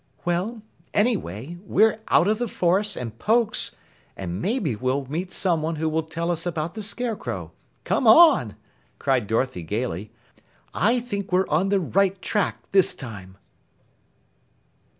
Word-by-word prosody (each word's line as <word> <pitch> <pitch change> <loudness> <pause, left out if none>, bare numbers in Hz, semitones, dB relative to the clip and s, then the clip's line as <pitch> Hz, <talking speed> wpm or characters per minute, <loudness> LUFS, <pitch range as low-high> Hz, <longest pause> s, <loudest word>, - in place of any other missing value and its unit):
"Well, 190 +6 -1 0.3
anyway, 175 - -1
we're 215 +2 +3
out 175 - +4
of 215 +1 +1
the 240 - -1
forest 195 +2 +1
and 115 -2 -6
Pokes, 225 - +1 0.4
and 90 0 -4
maybe 200 - 0
we'll 130 +5 -1
meet 170 +7 -4
someone 165 -3 0
who 160 +1 -1
will 160 +1 +1
tell 165 +2 -3
us 170 -1 -2
about 165 -1 -3
the 220 - -6
Scarecrow. 220 +2 -4 0.3
Come 250 - +1
on!" 275 - +7 0.4
cried 130 -6 0
Dorothy 115 -2 -1
gaily. 105 +2 -3 0.6
"I 235 +6 +2
think 200 -6 -5
we're 185 +1 +2
on 165 +6 +2
the 200 0 +3
right 195 +2 +1
track 210 +1 -1
this 195 -2 +4
time." 100 -7 -9
175 Hz, 140 wpm, -24 LUFS, 130-210 Hz, 0.6 s, on